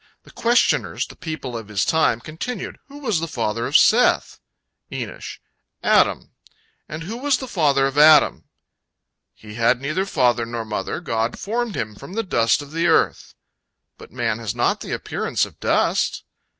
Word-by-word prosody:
The - - -17
questioners, 240 +1 +1
the - - -13
people 155 -8 -6
of 115 -2 -6
his 105 -2 0
time, 155 -7 +2
continued: 180 - -6
"Who 285 0 -12
was 225 - -1
the 165 - -3
father 115 -5 -2
of - - +5
Seth?" - - +3 0.5
Enosh: - - -6 0.5
"Adam."—"And 155 +1 -1
who 205 +7 -6
was 275 0 +1
the 260 - -7
father 145 - +2
of 135 +1 0
Adam?"—"He 150 -7 +1
had 120 +2 +2
neither 155 +8 -2
father 125 -8 +2
nor 115 -1 -4
mother, 105 - -4
God 115 -7 -2
formed 230 +1 -3
him 110 -1 -3
from 175 - -11
the 225 +2 -1
dust 120 - +1
of 145 - -13
the 165 +2 0
earth."—"But 165 - -3
man 110 - -2
has 115 -1 -4
not 120 - +1
the - - -7
appearance - - -1
of - - -16
dust!" - - +1
145 Hz, 155 wpm, -22 LUFS, 115-185 Hz, 0.5 s, of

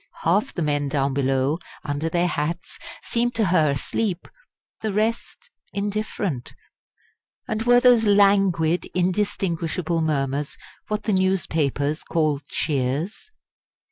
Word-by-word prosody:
Half 190 +6 +1
the 175 - -1
men 145 -1 0
down 135 -1 0
below, 135 +3 +1 0.2
under 150 +2 -2
their 175 +1 +1
hats, 170 +1 -3 0.2
seemed 240 0 0
to 225 - +2
her 170 -4 +3
asleep; 175 - -2 0.5
the 220 - -1
rest 225 - -2 0.2
indifferent. 200 - -3 0.9
And 220 0 -2
were 245 +1 +5
those 245 -2 +5
languid, 195 -5 +3
indistinguishable 175 -3 0
murmurs 145 -2 -1 0.3
what 210 0 -2
the 215 - 0
newspapers 155 -6 0
call 155 -3 0
"cheers"? 145 - -2
170 Hz, 110 wpm, -23 LUFS, 145-205 Hz, 0.9 s, were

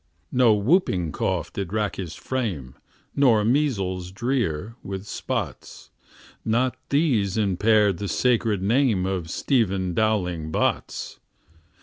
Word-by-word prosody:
No 125 -4 +5
whooping 100 - +2
cough - - -2
did 95 -3 -4
rack 105 -1 -1
his 90 -4 -5
frame, 95 - -3 0.4
Nor 115 -7 +4
measles 100 -9 0
drear, 115 - -2
with 95 0 -6
spots; - - -5 0.5
Not 120 +3 +1
these 125 - +1
impaired 105 -1 +3
the 100 - -3
sacred 115 -4 +1
name 110 -3 +2
Of 95 -4 -2
Stephen 95 - 0
Dowling 90 -7 0
Bots. - - -2
105 Hz, 110 wpm, -24 LUFS, 95-120 Hz, 0.5 s, No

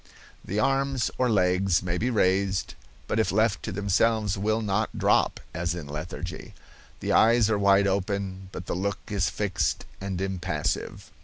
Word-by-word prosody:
The 100 - -4
arms 135 0 +1
or 125 -1 +3
legs 90 -3 +2
may 90 -1 -1
be 125 - 0
raised, 95 -3 +1 0.3
but 110 - -1
if 110 - +2
left 110 +2 +2
to - - -4
themselves 105 +2 +1
will 110 +3 0
not 105 +1 -1
drop, - - +2
as 85 0 -2
in 85 -4 -6
lethargy. 80 +4 -6 0.5
The - - -1
eyes 115 -1 +5
are 105 - +1
wide 100 0 +4
open, 95 -1 -2
but 90 - -7
the - - -3
look 100 +3 -1
is 100 -3 +1
fixed 90 -8 -1 0.2
and 95 -2 -3
impassive. 95 -5 -3
100 Hz, 160 wpm, -26 LUFS, 90-110 Hz, 0.5 s, eyes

